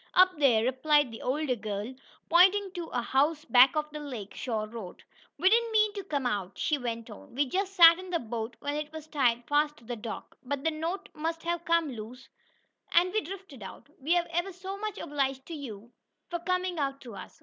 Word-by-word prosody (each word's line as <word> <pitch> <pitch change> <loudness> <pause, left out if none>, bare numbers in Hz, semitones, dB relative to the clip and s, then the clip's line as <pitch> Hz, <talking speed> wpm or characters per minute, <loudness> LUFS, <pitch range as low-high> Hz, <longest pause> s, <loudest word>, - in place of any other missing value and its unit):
"Up 370 0 +7
there," 240 -6 +4
replied 265 +2 +2
the 225 - -9
older 270 0 0
girl, 210 +2 -4 0.3
pointing 380 +3 +5
to 345 -2 -5
a 245 - -2
house 295 +5 +1
back 250 +2 +6
of 300 0 -1
the 300 - -6
lake 245 -9 -7
shore 220 -4 -3
road. 215 -5 -9 0.3
"We 350 +6 +2
didn't 460 +3 +4
mean 430 -1 +3
to 400 -1 -5
come 285 -8 -2
out," 200 -5 -2
she 300 -2 0
went 230 -2 -4
on. 220 +3 -13
"We 285 +2 +2
just 390 +7 -2
sat 335 -1 +9
in 370 0 -8
the 355 - +1
boat 230 -3 -5
when 285 - -2
it 300 0 -4
was 315 -1 -8
tied 245 -6 +1
fast 295 +1 +2
to - - -18
the 240 +1 -5
dock, 220 0 -8
but 275 +1 -3
the 320 - +2
knot 345 +6 -4
must 325 +1 -3
have 340 0 -2
come 335 -3 +2
loose, 235 +2 -9 0.6
and 360 +2 +4
we 435 - +2
drifted 375 - -9
out. 195 - -10
We're 340 +5 +2
ever 345 +3 -1
so 375 +2 -6
much 425 0 -4
obliged 270 -2 -2
to 335 - -8
you 235 -7 -8 0.4
for 345 - -1
coming 365 0 -1
out 275 -1 -1
to 240 -3 -10
us." 315 - -10
295 Hz, 215 wpm, -29 LUFS, 245-345 Hz, 0.6 s, sat